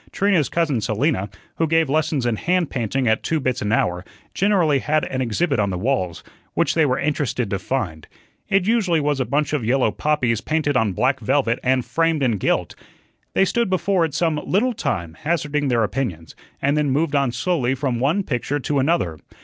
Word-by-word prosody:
Trina's 190 -9 +2
cousin 155 -9 0
Selina, 110 - 0 0.3
who 165 - +1
gave 165 0 +2
lessons 150 -2 0
in 120 -2 +1
hand 180 - 0
painting 125 +1 -1
at 110 0 +2
two 160 - -1
bits 130 -2 -1
an 105 - -1
hour, 90 -5 +1 0.3
generally 180 -8 +2
had 155 +3 0
an 130 - -3
exhibit 130 +4 0
on 100 -1 +1
the 90 - -2
walls, 95 -6 -1 0.3
which - - +2
they 160 -3 +3
were 125 - +1
interested 140 -6 -1
to 100 - -1
find. 95 - -3 0.4
It 195 -2 +2
usually 200 -7 +2
was 145 -1 0
a 130 - +1
bunch 145 +5 0
of 145 -5 0
yellow 125 0 +2
poppies 125 -7 0
painted 155 -2 0
on 110 -5 +2
black 130 +8 +1
velvet 130 -3 +1
and 130 -1 +1
framed 165 -3 +1
in 120 -5 +1
gilt. - - 0 0.6
They 195 - +4
stood 235 +2 0
before 185 0 +1
it 160 -4 -2
some 160 -3 0
little 240 +7 +1
time, 85 - -3
hazarding 150 -2 0
their 120 -3 +2
opinions, 100 - -3 0.3
and 140 +2 +2
then 150 -1 +1
moved 145 +3 0
on 140 -3 +2
slowly 130 0 0
from 130 -3 -2
one 155 +10 +1
picture 135 0 -2
to 145 +1 -1
another. 130 - 0
140 Hz, 195 wpm, -21 LUFS, 120-160 Hz, 0.6 s, They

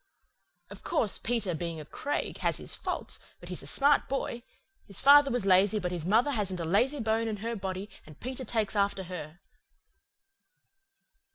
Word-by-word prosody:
Of - - -10
course, 235 - +1
Peter, 225 -6 -1
being 165 0 -4
a 155 - -8
Craig, 285 - -4
has - - 0
his - - -6
faults, - - -4 0.2
but - - -12
he's - - -4
a - - -6
smart 285 +1 +4
boy. 265 -3 -2 0.5
His 200 - -3
father 285 0 +7
was 245 -5 -1
lazy 195 +2 +4
but 180 -3 -2
his 170 -2 -3
mother 230 +8 +3
hasn't 195 -7 -1
a 165 - -3
lazy 250 - +2
bone 225 0 0
in 215 -1 -3
her 230 0 -2
body, 190 0 -4 0.2
and 155 -1 -14
Peter 260 +1 -5
takes 220 -3 -1
after 200 -1 +1
her." 175 -1 -8
210 Hz, 175 wpm, -29 LUFS, 185-245 Hz, 0.5 s, father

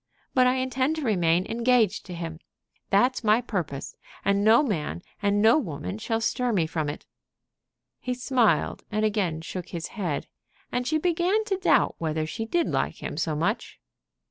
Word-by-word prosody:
But 255 -1 +5
I 250 - +3
intend 260 +3 0
to 315 - -4
remain 180 -6 +2
engaged 230 -3 +2
to 180 - -6
him. 165 -1 -6 0.5
That's 245 +6 +3
my 215 +1 +4
purpose, 175 - -4 0.3
and 200 0 +2
no 225 +6 +6
man 175 - -2 0.2
and 205 0 +2
no 230 +7 +6
woman 170 - -5
shall 225 0 -1
stir 245 +2 0
me 180 -7 +2
from 155 -2 -2
it." 145 - -7 0.9
He 250 0 -3
smiled, 250 -2 +1
and 215 +1 +1
again 190 -7 0
shook 180 +2 -6
his 170 -1 -5
head, 180 -10 -3 0.5
and 245 0 -1
she 310 - +2
began 355 +6 +1
to 405 -3 0
doubt 375 - +3
whether 155 -1 -1
she 225 +8 -4
did 345 +6 +1
like - - -2
him - - -4
so 155 0 -1
much. 200 +9 -2
215 Hz, 170 wpm, -26 LUFS, 170-250 Hz, 0.9 s, no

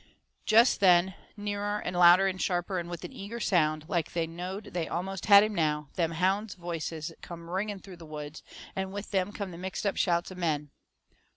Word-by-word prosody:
Jest 230 +3 +5
then, 185 -1 +5 0.2
nearer 205 0 -2
and 185 - -4
louder 175 +2 +7
and 190 -1 -1
sharper, 180 +1 0
and 170 0 -6
with 175 -1 -6
an - - -7
eager 230 0 -7
sound, 155 -7 +1
like 175 -4 -1
they 170 -1 0
knowed 180 +5 -7
they 170 -2 -1
almost 190 +2 -4
had 200 -1 +9
him 215 0 -1
now, 150 -5 0
them 165 -2 0
hounds' 190 +5 0
voices 165 -2 -5
come 170 -1 -9
ringing 195 +4 -2
through 190 -1 -12
the 170 - -12
woods, 150 0 -7 0.3
and 190 0 -3
with 205 +1 -6
them 190 0 0
come 200 -2 -5
the 170 - -9
mixedup 190 +2 -2
shouts 175 0 +1
of 185 - -9
men. 150 -4 -1
180 Hz, 195 wpm, -29 LUFS, 170-200 Hz, 0.3 s, had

